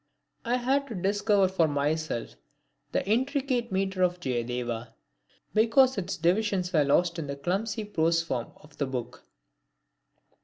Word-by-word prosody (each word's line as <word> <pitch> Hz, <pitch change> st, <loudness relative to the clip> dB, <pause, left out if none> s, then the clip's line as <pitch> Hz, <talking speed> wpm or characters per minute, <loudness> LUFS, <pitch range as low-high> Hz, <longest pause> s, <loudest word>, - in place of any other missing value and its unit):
I 240 Hz, +2 st, +1 dB
had 270 Hz, +3 st, +1 dB
to 230 Hz, -, -6 dB
discover 200 Hz, +1 st, +2 dB
for 185 Hz, -3 st, +2 dB
myself 145 Hz, -3 st, -1 dB, 0.6 s
the -, -, -1 dB
intricate 255 Hz, +1 st, 0 dB
metre 190 Hz, 0 st, -1 dB
of 180 Hz, 0 st, +2 dB
Jayadeva, 120 Hz, -4 st, -3 dB, 0.6 s
because 240 Hz, +4 st, +4 dB
its 190 Hz, -2 st, -3 dB
divisions 185 Hz, +1 st, +1 dB
were 155 Hz, -3 st, +5 dB
lost 170 Hz, +4 st, +2 dB
in 150 Hz, -, -4 dB
the 140 Hz, -, -4 dB
clumsy 200 Hz, +9 st, -2 dB
prose 165 Hz, -4 st, +1 dB
form 125 Hz, -7 st, -3 dB
of 150 Hz, -1 st, -19 dB
the 140 Hz, -, 0 dB
book. 125 Hz, -1 st, -6 dB
180 Hz, 140 wpm, -28 LUFS, 145-220 Hz, 0.6 s, were